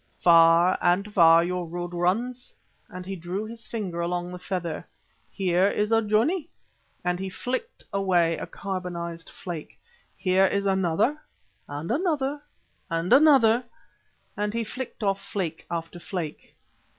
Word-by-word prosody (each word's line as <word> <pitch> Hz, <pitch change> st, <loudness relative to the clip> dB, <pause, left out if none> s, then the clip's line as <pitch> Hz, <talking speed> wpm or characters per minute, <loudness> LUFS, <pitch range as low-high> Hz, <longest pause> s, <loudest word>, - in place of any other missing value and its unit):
Far 170 Hz, +1 st, +6 dB
and 195 Hz, +4 st, +1 dB
far 165 Hz, -3 st, +7 dB
your 180 Hz, 0 st, -2 dB
road 175 Hz, +1 st, -5 dB
runs," 230 Hz, +9 st, -1 dB, 0.3 s
and 180 Hz, 0 st, -8 dB
he 195 Hz, +1 st, -4 dB
drew 180 Hz, +4 st, -4 dB
his 230 Hz, 0 st, -9 dB
finger 190 Hz, -7 st, -3 dB
along 175 Hz, +1 st, -2 dB
the 180 Hz, -, -7 dB
feather. 180 Hz, -3 st, -4 dB, 0.4 s
"Here 185 Hz, -1 st, +2 dB
is 210 Hz, +1 st, 0 dB
a 225 Hz, 0 st, +5 dB
journey," 255 Hz, -, +1 dB, 0.6 s
and 180 Hz, 0 st, 0 dB
he 190 Hz, 0 st, -3 dB
flicked 260 Hz, -, -4 dB
away 180 Hz, -4 st, +2 dB
a -, -, -6 dB
carbonised 175 Hz, -3 st, -5 dB
flake, 170 Hz, -5 st, -8 dB, 0.4 s
"here 190 Hz, 0 st, +3 dB
is 200 Hz, +1 st, -1 dB
another, 195 Hz, -, +1 dB, 0.5 s
and 145 Hz, +5 st, -5 dB
another, 290 Hz, -2 st, 0 dB, 0.5 s
and 165 Hz, +1 st, +1 dB
another," 260 Hz, -5 st, +6 dB, 0.7 s
and 210 Hz, +1 st, -2 dB
he 230 Hz, -, 0 dB
flicked 245 Hz, +1 st, -6 dB
off 195 Hz, -1 st, +1 dB
flake 170 Hz, -5 st, -4 dB
after 170 Hz, +1 st, -4 dB
flake. 170 Hz, -4 st, -6 dB
185 Hz, 140 wpm, -26 LUFS, 175-220 Hz, 0.7 s, far